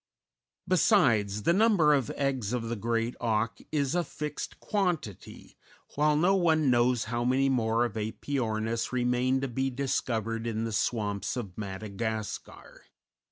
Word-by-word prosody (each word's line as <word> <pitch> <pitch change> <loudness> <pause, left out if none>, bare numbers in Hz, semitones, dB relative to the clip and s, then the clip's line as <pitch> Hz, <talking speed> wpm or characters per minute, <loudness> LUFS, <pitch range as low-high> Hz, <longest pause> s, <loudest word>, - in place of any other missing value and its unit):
Besides, 115 - +3
the 170 - +3
number 195 -7 +4
of 135 -6 +1
eggs 130 -6 -1
of 115 -2 -2
the 120 - -1
great 115 +2 -1
auk 115 -1 0
is 140 -3 0
a 175 0 +1
fixed 150 -1 -6
quantity, 175 - -3 0.4
while 150 +1 +2
no 175 +6 +3
one 160 -7 +3
knows 120 -1 +3
how 120 +2 -2
many 130 +2 +2
more 115 -2 +2
of 120 - -4
Æpyornis 115 0 -2
remain 125 +1 +1
to 135 - -1
be 130 +2 -1
discovered 115 -4 -2
in 110 -1 -2
the 115 - -3
swamps 105 0 -1
of 100 -7 -5
Madagascar. 110 +1 -5
120 Hz, 140 wpm, -29 LUFS, 110-140 Hz, 0.4 s, number